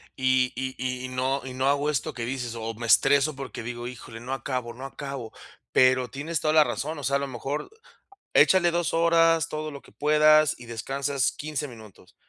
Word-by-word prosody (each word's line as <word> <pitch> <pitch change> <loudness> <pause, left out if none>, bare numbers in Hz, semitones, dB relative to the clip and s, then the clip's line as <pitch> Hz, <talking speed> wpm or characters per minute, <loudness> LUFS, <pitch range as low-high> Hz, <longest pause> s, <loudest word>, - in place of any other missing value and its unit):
y 130 -1 +2
y 130 0 -4 0.3
y - - -4
no 130 +2 -1
y 130 -1 -7
no 130 +1 0
hago 145 +1 +2
esto 150 -3 -2
que 120 -2 -4
dices 125 -2 -4
o 115 -1 -5
me 115 +2 -6
estreso 140 +5 +4
porque 135 -3 -7
digo: 120 +1 -5
"Híjole, 115 -2 -9
no 125 +3 -5
acabo, 125 -3 -4
no 130 +2 -8
acabo". 135 -4 -6 0.4
Pero 130 -1 +4
tienes 150 +3 -3
toda 155 - +1
la 155 -1 +7
razón, 150 +1 -4
o - - -8
sea, 140 +1 +1
a - - +2
lo 140 - -2
mejor, 135 - -5 0.6
échale 175 -2 +5
2 170 -1 0
horas, 165 -1 +4
todo 155 -1 -4
lo 140 -2 -10
que - - -18
puedas, 155 0 +4
y 120 - -11
descansas 135 +4 -1
15 150 -1 -4
minutos, 110 -7 -15
135 Hz, 200 wpm, -26 LUFS, 125-150 Hz, 0.6 s, la